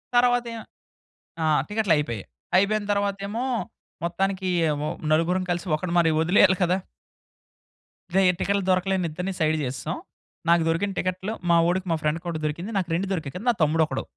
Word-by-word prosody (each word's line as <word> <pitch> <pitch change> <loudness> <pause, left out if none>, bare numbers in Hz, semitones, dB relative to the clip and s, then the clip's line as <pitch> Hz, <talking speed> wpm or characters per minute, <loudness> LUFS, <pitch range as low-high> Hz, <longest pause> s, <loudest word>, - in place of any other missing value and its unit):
తరువాతేమో 240 -2 +2 0.8
ఆ! - - +1 0.2
టికెట్లయిపోయాయి. 150 - 0 0.3
అయిపోయిన 205 +2 +2
తర్వాతేమో, 200 +3 -1 0.6
మొత్తానికి 190 +2 -1 0.4
ఒ - - -1 0.2
నలుగురం 170 +4 +2
కలిసి 175 +1 -2
ఒకడిని 170 +2 -4
మరి 165 -1 +4
వదిలేయాలి 185 +3 +5
కదా! 180 +1 +3 1.4
రేయ్! 190 -1 +5
టికెట్లు 200 0 +1
దొరకలేని 185 0 +1
ఇద్దరిని 180 +5 -4
సైడ్ 155 -1 +2
జేసేసాం. 130 0 -3 0.5
నాకు 170 -1 +5
దొరికిన 165 +5 0
టికెట్లు 185 +3 -2 0.2
మా 170 - +6
వోడికి 185 +2 0
మా - - +3
ఫ్రెండ్‌కొకటి 165 +2 -2
దొరికింది. 170 +8 -3
నాకు 180 -3 -1
2 190 +4 -1
దొరికాయి 155 -7 -4
కదా! 190 +6 -6
నా - - +5
తమ్ముడొకడు 155 -3 +1
180 Hz, 140 wpm, -25 LUFS, 165-200 Hz, 1.4 s, మా